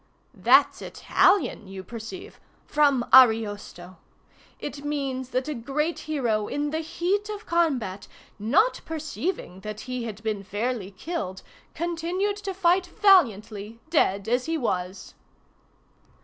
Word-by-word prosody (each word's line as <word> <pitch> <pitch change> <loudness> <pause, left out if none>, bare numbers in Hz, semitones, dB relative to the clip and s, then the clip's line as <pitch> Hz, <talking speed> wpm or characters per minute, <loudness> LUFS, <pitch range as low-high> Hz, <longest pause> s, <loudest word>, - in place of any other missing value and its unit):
"That's - - +4
Italian, 375 - +2
you 190 0 -8
perceive—from 280 - -2
Ariosto. 205 -7 +4 0.6
It 285 0 -6
means 270 -3 -3
that 255 +1 -1
a 305 - -2
great 290 +7 -2
hero, 230 -8 0
in 290 0 -2
the 315 - -1
heat 370 +6 -1
of 420 0 -6
combat, 265 - 0 0.3
not 355 - +2
perceiving 315 - -4
that 215 +2 -7
he 250 -2 -4
had 215 -1 -7
been 215 -2 -2
fairly 205 +1 -3
killed, 200 - -5 0.3
continued 345 +5 -1
to 400 -2 -5
fight 360 0 +3
valiantly, 230 - +2
dead 200 - +2
as 245 +2 +1
he 325 0 0
was. 185 - -3
260 Hz, 120 wpm, -26 LUFS, 215-340 Hz, 0.6 s, That's